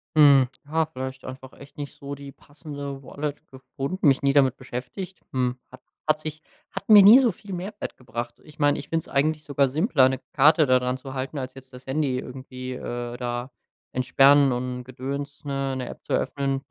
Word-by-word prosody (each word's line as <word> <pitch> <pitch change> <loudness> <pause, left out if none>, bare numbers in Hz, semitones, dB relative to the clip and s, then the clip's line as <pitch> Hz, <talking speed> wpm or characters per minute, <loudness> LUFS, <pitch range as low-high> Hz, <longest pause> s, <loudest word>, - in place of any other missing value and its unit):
Hm, 140 -4 +7 0.2
ja, 160 +2 +1
vielleicht 130 -3 -7
einfach 130 0 -9
echt 140 +1 -15
nicht 145 -1 -6
so 140 0 -7
die 140 0 -9
passende 145 -1 -8
Wallet 145 +2 -5
gefunden 135 +6 -3
mich 135 -2 +4
nie 140 0 +2
damit 135 -3 +4
beschäftigt, 130 +9 -7
hm, 125 -1 0
hat 130 - -13 0.2
hat 155 0 +2
sich 155 0 -5 0.3
hat - - -6
mir 210 -2 +10
nie 205 +5 +10
so 255 -4 +4
viel 200 +1 -10
Mehrwert 195 +4 -5
gebracht. 120 -1 -6
Ich 155 0 -17
meine, 145 -1 +3
ich - - -8
finde 165 -1 0
es - - -14
eigentlich 155 +2 +1
sogar 140 -1 +2
simpler, 145 - +3
'ne 130 -1 -2
Karte 150 +3 +6
da 130 -1 +5
dran 125 0 -1
zu 130 0 -9
halten, 135 +2 -4
als 130 0 -5
jetzt 135 -1 -13
das 125 0 -12
Handy 135 -2 0
irgendwie, 130 0 -7
äh, 120 -1 -5
da 120 +1 -4 0.4
entsperren 135 +2 +5
und 125 0 -3
Gedöns, 140 +3 -6
ne, 135 -1 -2
'ne 125 -1 -4
App - - -10
zu - - -10
öffnen. 135 -1 0
135 Hz, 200 wpm, -25 LUFS, 130-150 Hz, 0.4 s, mir